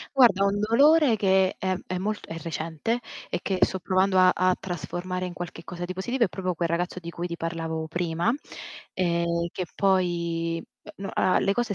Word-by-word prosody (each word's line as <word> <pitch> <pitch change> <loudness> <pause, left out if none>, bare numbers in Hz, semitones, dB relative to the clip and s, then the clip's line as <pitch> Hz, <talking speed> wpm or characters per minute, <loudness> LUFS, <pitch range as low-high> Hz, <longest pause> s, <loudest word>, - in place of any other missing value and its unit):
Guarda, 230 -7 +6
un 200 +1 +1
dolore 275 +4 +5
che 190 -2 +3
è 185 0 0
è 185 - -2
molt 205 +3 -3
è 165 - -6
recente 165 +7 -2 0.3
e - - -1
che 190 - -1
sto 190 - +3
provando 185 +1 +2
a 185 0 +7
a 185 0 +2
trasformare 180 +1 -4
in 180 - -5
qualche 175 -1 -7
cosa 175 +1 -6
di 185 - -5
positivo 240 +7 0
è - - +3
proprio 185 -1 -2
quel 170 0 -1
ragazzo 175 +2 -1
di 170 -1 -7
cui 170 +1 -5
ti 170 -1 -3
parlavo 165 -1 -3
prima, 170 +4 0 0.6
ehm, 170 -1 0
che 180 - -3
poi 170 -3 0 0.3
uhm, 195 - -6
n - - -4
ah, 185 - +3
le 195 - +2
cose 235 -1 -1
185 Hz, 195 wpm, -26 LUFS, 170-195 Hz, 0.6 s, a